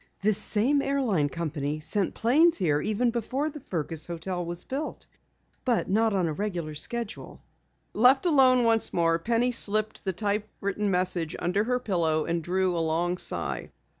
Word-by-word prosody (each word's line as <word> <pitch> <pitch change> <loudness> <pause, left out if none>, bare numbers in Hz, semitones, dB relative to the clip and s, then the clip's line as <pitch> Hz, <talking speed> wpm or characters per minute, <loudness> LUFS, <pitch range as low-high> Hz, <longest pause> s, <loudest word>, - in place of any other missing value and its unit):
"This 210 0 +2
same 245 +8 +2
airline 245 - 0
company 150 -2 -3
sent 190 +5 0
planes 310 +9 +4
here 150 -6 +1
even 220 +4 0
before 260 +6 -2
the 295 - -9
Fergus 165 - -3
hotel 175 +1 -4
was 175 +1 -4
built, 285 +4 -5 0.6
but 245 -3 +1
not 220 +2 +3
on 190 -3 +1
a 160 - -1
regular 175 -4 -4
schedule." 230 +8 -4 0.5
Left 255 - +4
alone 260 -6 +5
once 225 -1 +2
more, 165 -1 +1
Penny 235 +6 +1
slipped 215 -2 +1
the 190 - -1
typewritten 205 +1 -2
message 180 -3 0
under 190 +5 0
her 250 +1 +1
pillow 165 -8 0
and 170 0 -1
drew 185 +1 0
a - - 0
long 170 +3 -1
sigh. - - -2
200 Hz, 160 wpm, -27 LUFS, 170-235 Hz, 0.6 s, alone